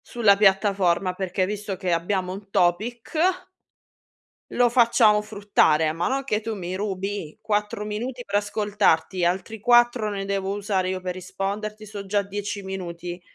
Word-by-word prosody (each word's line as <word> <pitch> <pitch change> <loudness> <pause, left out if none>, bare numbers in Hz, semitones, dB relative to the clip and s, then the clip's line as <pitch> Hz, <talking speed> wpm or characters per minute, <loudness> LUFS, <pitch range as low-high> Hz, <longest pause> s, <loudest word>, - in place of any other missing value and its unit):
Sulla 220 -4 +4
piattaforma, 195 -2 +2
perché 185 0 -1
visto 205 0 -4
che 180 -1 -2
abbiamo 180 +2 -1
un 195 +1 -10
topic 205 +7 0 1.4
lo 245 - +4
facciamo 235 -3 +4
fruttare, 200 -7 +2
ma 170 +2 -1
non 270 +1 -1
che 215 -5 0
tu 225 0 -4
mi 185 -2 -5
rubi 195 -4 -4
4 210 -1 -1
minuti 240 +4 -5
per 200 - -4
ascoltarti, 205 -4 +1
altri 190 +5 -1
4 240 -1 +4
ne 200 -1 -4
devo 195 0 -2
usare 200 -2 -1
io 185 0 -2
per 180 -1 -4
risponderti, 200 +4 -5
so' 205 -1 -8
già 205 +1 +1
10 200 +1 -5
minuti. 175 -2 -6
200 Hz, 150 wpm, -24 LUFS, 185-210 Hz, 1.4 s, Sulla